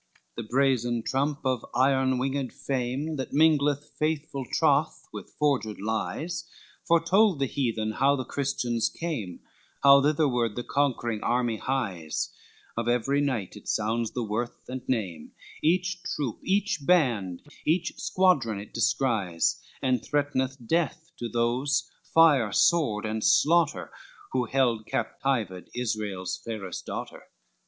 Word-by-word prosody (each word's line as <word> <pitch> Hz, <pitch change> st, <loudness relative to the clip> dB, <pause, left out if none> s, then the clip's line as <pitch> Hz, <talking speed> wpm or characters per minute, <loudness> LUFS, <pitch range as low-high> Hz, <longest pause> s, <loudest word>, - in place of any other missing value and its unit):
LXXXI -, -, -37 dB
The 115 Hz, -2 st, -6 dB
brazen 120 Hz, -3 st, +1 dB
trump 140 Hz, +3 st, -1 dB
of 130 Hz, -3 st, 0 dB
iron 130 Hz, 0 st, +3 dB
winged 135 Hz, 0 st, -1 dB
fame, 135 Hz, +4 st, -2 dB
That 130 Hz, -, -5 dB
mingleth 150 Hz, -1 st, +3 dB
faithful 150 Hz, -4 st, -2 dB
troth 155 Hz, 0 st, +2 dB
with -, -, -8 dB
forged 135 Hz, -8 st, 0 dB
lies, 110 Hz, -, -3 dB, 0.4 s
Foretold 170 Hz, +3 st, +4 dB
the 140 Hz, -, +1 dB
heathen 115 Hz, -5 st, -1 dB
how 135 Hz, +5 st, +3 dB
the 130 Hz, -2 st, -4 dB
Christians 120 Hz, -5 st, -1 dB
came, 130 Hz, -, -5 dB, 0.4 s
How 140 Hz, 0 st, +8 dB
thitherward 135 Hz, -7 st, +1 dB
the 120 Hz, -, -3 dB
conquering 120 Hz, -6 st, 0 dB
army 120 Hz, -2 st, +1 dB
hies, 100 Hz, -, -2 dB, 0.4 s
Of 115 Hz, 0 st, -2 dB
every 125 Hz, +4 st, +2 dB
knight 125 Hz, -10 st, -2 dB
it 105 Hz, -, -12 dB
sounds 110 Hz, +1 st, 0 dB
the 125 Hz, -, -2 dB
worth 110 Hz, +3 st, -3 dB
and 130 Hz, 0 st, -5 dB
name, 95 Hz, -11 st, -2 dB, 0.3 s
Each 180 Hz, +2 st, +1 dB
troop, 140 Hz, -9 st, -3 dB
each 200 Hz, -1 st, +1 dB
band, 120 Hz, -, +2 dB, 0.2 s
each 165 Hz, +3 st, +1 dB
squadron 140 Hz, -, +2 dB
it 100 Hz, -, -10 dB
descries, 110 Hz, -, +1 dB, 0.2 s
And 130 Hz, -1 st, +2 dB
threat'neth 135 Hz, -3 st, -1 dB
death 165 Hz, +3 st, -1 dB
to 120 Hz, -, -3 dB
those, 120 Hz, +2 st, 0 dB, 0.2 s
fire, 145 Hz, -10 st, +5 dB
sword 115 Hz, -, +3 dB
and 110 Hz, 0 st, -2 dB
slaughter, 165 Hz, 0 st, +3 dB, 0.4 s
Who 125 Hz, -1 st, +1 dB
held 120 Hz, -3 st, +1 dB
captived 110 Hz, -9 st, -2 dB
Israel's 105 Hz, -6 st, -3 dB
fairest 105 Hz, -5 st, -6 dB
daughter. -, -, -6 dB
130 Hz, 130 wpm, -27 LUFS, 115-145 Hz, 0.4 s, How